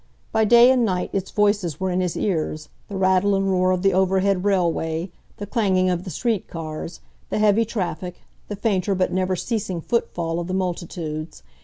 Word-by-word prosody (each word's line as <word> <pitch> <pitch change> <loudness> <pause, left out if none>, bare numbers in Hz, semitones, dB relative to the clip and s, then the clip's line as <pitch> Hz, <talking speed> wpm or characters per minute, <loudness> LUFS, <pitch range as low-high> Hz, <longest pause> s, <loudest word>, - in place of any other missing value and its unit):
By 220 0 +2
day 240 +3 +7
and 255 -2 +3
night 185 -4 -1
its 195 -1 -2
voices 205 -7 +1
were 190 -1 -1
in 180 +1 0
his 180 -2 -2
ears, 155 -5 -2 0.2
the 200 - -5
rattle 190 +1 +3
and 195 0 +1
roar 185 0 +2
of 185 0 0
the 195 -1 +3
overhead 190 0 +2
railway, 170 -3 0 0.3
the 205 - -5
clanging 190 -4 +1
of 180 0 -2
the - - -5
street 215 - -1
cars, 160 +1 -6 0.3
the - - -1
heavy 215 +1 +3
traffic, 180 -5 -4 0.3
the 205 - -4
fainter 200 -2 0
but 185 0 0
never 185 0 0
ceasing 195 -3 -3
foot 235 +8 -1
fall 165 -1 -2
of 170 - -4
the 185 - -2
multitudes. 170 - -4
185 Hz, 190 wpm, -23 LUFS, 175-205 Hz, 0.3 s, day